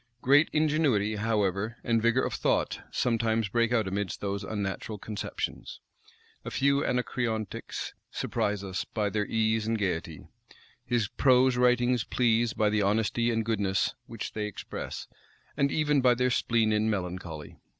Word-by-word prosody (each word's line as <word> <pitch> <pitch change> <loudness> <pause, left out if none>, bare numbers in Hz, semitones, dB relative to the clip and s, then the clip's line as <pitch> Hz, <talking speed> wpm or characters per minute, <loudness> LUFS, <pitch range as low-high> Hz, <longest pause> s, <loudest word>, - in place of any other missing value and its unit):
Great 145 +4 +5
ingenuity, 145 -9 +2
however, 105 0 0
and 115 -1 +2
vigor 115 +3 +3
of - - -3
thought, - - 0
sometimes 115 -2 +1
break 115 +2 +1
out 115 -5 +2
amidst 100 0 -3
those 100 0 -3
unnatural 105 +1 -4
conceptions: 105 +1 -5 0.6
a - - -5
few 140 +1 +2
anacreontics 120 -5 -2 0.2
surprise 105 -1 -2
us 95 -1 -3
by 105 -2 -2
their 105 -1 -1
ease 110 -1 +1
and 115 0 +1
gayety: 85 -7 -3 0.6
his 120 -4 0
prose 130 +1 +4
writings 125 -1 +3
please 120 -1 +2
by 105 - +1
the 105 0 +2
honesty 110 +3 +1
and 115 -1 0
goodness 105 -3 0
which 115 -3 -6
they 105 -1 -2
express, 105 - -6 0.5
and 140 -1 +1
even 150 -2 +2
by 125 -1 +5
their 125 +1 +1
spleen 115 -3 +2
and 105 +1 +2
melancholy. 90 -6 -4
110 Hz, 145 wpm, -28 LUFS, 105-120 Hz, 0.6 s, Great